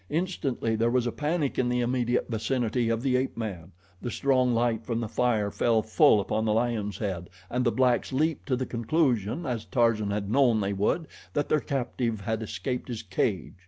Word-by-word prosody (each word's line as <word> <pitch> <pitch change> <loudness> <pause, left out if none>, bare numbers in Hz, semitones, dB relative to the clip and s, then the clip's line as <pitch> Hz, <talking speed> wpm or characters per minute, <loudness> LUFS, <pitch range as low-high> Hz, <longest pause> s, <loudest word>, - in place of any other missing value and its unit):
Instantly 145 -9 -1
there 115 +2 +2
was 125 0 +1
a 120 - 0
panic 150 0 -1
in 125 -1 +2
the 125 0 +1
immediate 120 0 0
vicinity 120 0 0
of 115 +1 0
the 130 -2 +2
ape 130 -1 -1
man. 95 -6 -5 0.3
The 120 - -3
strong 130 -1 +2
light 115 -1 +1
from 115 0 -2
the 115 - -2
fire 110 -3 +1
fell 115 0 +2
full 110 -1 +5
upon 110 +2 -1
the 105 - +2
lion 110 -2 0
head 95 -5 -4 0.2
and 125 +1 0
the 120 - +2
blacks 125 0 +2
leaped 155 +4 0
to 130 - +2
the 130 +1 -2
conclusion, 125 - 0
as 120 -5 -2
Tarzan 115 -4 +2
had 100 0 -2
known 125 -4 +4
they 100 -1 -1
would, 105 - 0 0.3
that 145 - -1
their 155 - +3
captive 120 -5 -2
had 110 +2 -2
escaped 125 +3 -4
his 115 -3 -5
cage. 95 0 -1
120 Hz, 195 wpm, -27 LUFS, 110-130 Hz, 0.3 s, full